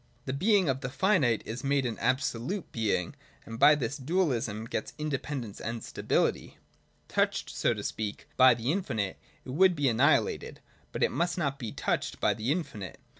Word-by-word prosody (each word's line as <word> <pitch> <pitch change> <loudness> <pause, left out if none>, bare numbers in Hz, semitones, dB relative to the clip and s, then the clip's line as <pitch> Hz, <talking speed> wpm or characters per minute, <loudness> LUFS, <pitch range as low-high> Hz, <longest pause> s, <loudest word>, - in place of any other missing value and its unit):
The 130 - -2
being 195 +4 +3
of 135 -1 0
the 125 - -3
finite 135 - +2
is 120 +2 -5
made 140 -1 +1
an 115 -3 -3
absolute 130 - -1
being, 110 -3 -1 0.3
and 115 0 -8
by 150 - +8
this 135 0 -3
dualism 130 - -1
gets 110 - -4
independence 140 -7 -4
and 115 0 -4
stability. - - -1 0.5
Touched, - - 0
so - - +1
to - - -6
speak, 110 +4 -4
by 130 -2 +7
the 120 +4 -1
infinite, 115 - -2 0.3
it - - -6
would 180 +5 +4
be 145 -3 +2
annihilated. 135 +6 +2 0.3
But - - -1
it - - +3
must 175 +1 0
not 140 -5 -1
be 115 -5 -4
touched - - -2
by - - +3
the 115 +5 -2
infinite. 115 - -4
130 Hz, 175 wpm, -29 LUFS, 115-150 Hz, 0.5 s, by